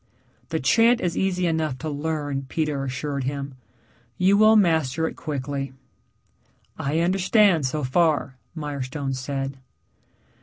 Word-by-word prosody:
"The 160 -1 -1
chant 230 - +4
is 175 -2 -1
easy 185 -2 0
enough 160 -5 0
to 155 - -6
learn," 145 -2 -3
Peter 150 -4 -1
assured 135 +1 -3
him. 140 0 -4 0.6
"You 190 +2 +4
will 215 +1 +6
master 160 -6 +2
it - - -6
quickly." 140 -2 -4 1.0
"I 150 +4 -1
understand 185 - +3
so 150 +3 -3
far," 145 0 +1 0.2
Mirestone 140 -2 -4
said. 135 +1 -4
150 Hz, 120 wpm, -24 LUFS, 135-170 Hz, 1.0 s, will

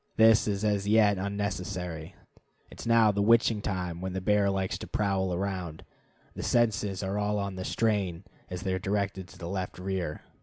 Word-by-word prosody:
This 110 0 +6
is 100 0 -1
as 100 -1 +1
yet 105 -2 +4
unnecessary. 90 -4 -4 0.6
It - - -13
is - - -6
now 115 -2 +5
the 100 0 0
witching 115 0 +4
time 90 -4 -3
when 95 0 -3
this 95 0 -3
bear 105 0 +3
likes 95 -1 -1
to - - -7
prowl 95 -2 0
around. 90 -3 -3 0.5
The - - -6
senses 105 -5 +1
are 95 +2 -1
all 105 0 0
on 100 -1 -3
the 95 - -4
strain 100 -5 0 0.3
as 90 0 -5
they 95 - 0
are 95 - -1
directed 100 -1 -2
to - - -15
the 85 - -6
left 95 0 -4
rear. 90 -4 -3
100 Hz, 190 wpm, -29 LUFS, 95-105 Hz, 0.6 s, This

